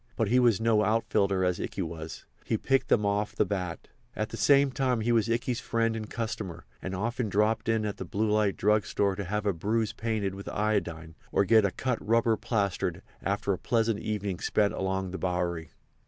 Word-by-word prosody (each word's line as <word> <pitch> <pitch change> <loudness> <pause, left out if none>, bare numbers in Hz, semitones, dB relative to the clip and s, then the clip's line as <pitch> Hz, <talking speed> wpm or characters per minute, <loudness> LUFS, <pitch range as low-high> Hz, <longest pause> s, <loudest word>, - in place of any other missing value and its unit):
But - - 0
he 125 - +4
was 120 -5 +4
no 110 -2 +3
outfielder 100 -4 +1
as 90 -1 0
Ikey 95 - -3
was; 80 -1 -7 0.2
he 110 - 0
picked 135 +4 +1
them 105 -3 +3
off 105 +1 0
the - - +2
bat. 90 -4 -4 0.3
At 110 0 -2
the - - -6
same 140 +2 +4
time 130 -3 0
he 120 +2 +1
was 115 -1 +2
Ikey's 120 +1 0
friend 115 0 0
and 110 -1 -5
customer, 105 -7 -4 0.2
and 95 0 -4
often 115 +3 -2
dropped 105 +2 +1
in 110 -1 +1
at 105 - -3
the - - -4
Blue 105 +4 -1
Light 105 -2 +2
Drug 105 0 +2
Store 100 -1 +1
to 100 - -4
have 105 +3 -2
a 100 - +2
bruise 105 +6 -1
painted 110 -4 -2
with 100 +1 -7
iodine 85 -6 -1 0.2
or 100 - +3
get 110 +1 +5
a - - +3
cut 125 +3 -2
rubber 115 +1 +3
plastered 100 -4 -1 0.2
after 100 0 0
a 90 - -4
pleasant 115 -2 +1
evening 105 -4 -3
spent 105 0 +1
along 95 -1 -2
the 95 - -5
Bowery. 90 -2 -2
105 Hz, 205 wpm, -28 LUFS, 95-115 Hz, 0.3 s, get